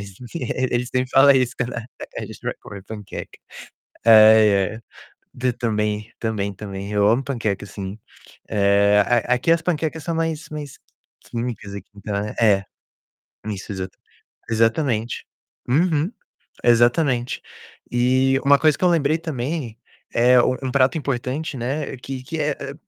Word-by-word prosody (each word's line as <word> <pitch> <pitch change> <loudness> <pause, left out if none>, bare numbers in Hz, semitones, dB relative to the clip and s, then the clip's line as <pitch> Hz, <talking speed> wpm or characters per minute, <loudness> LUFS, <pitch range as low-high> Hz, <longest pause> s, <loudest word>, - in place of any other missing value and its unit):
mas 100 -2 -9 0.2
ele 125 -4 -1
sempre 130 +1 -1
fala 135 0 +6
isso 125 0 +1
quando 125 -1 -2
a 120 +1 -7
gente - - -11
vai - - -2
comer 100 -1 -10
panqueca. 105 -1 -8 0.7
Ai, 110 -3 +7
ai. 110 - -9 0.5
D 125 -1 -1
também, 105 -2 -2
também, 100 -3 -2
também. 100 0 -7
Eu 105 0 +3
amo 120 +5 +3
panqueca, 115 -8 -2
sim 100 0 -7 0.5
é, 100 0 +4 0.3
a 125 - +4
aqui 130 +7 +1
as 165 0 +3
panquecas 160 -2 -2
são 165 - -2
mais 160 -1 -2
mais 150 -3 -7 0.4
químicas 115 -4 -5
aqui. 100 - -9
Então 100 0 -5 0.3
é. 100 -3 +4 0.8
Isso, 105 -1 -5
exa 95 0 -4 0.6
exatamente. 115 0 0 0.4
Uhum. 160 - +2 0.5
Exatamente. 120 +2 +3 0.5
E 130 +2 +3
uma 140 0 +6
coisa 155 -2 +3
que - - 0
eu 180 - +6
lembrei 155 -2 +2
também 140 -6 -4 0.4
é: 125 +1 +5
um 130 - +1
um 130 - -1
prato 135 +3 +3
importante, 140 +1 -3
né, 135 +4 -3
que 130 +1 -6
que 160 +5 -6
é 150 0 +1
é, 140 0 -7
125 Hz, 145 wpm, -22 LUFS, 105-140 Hz, 0.8 s, Ai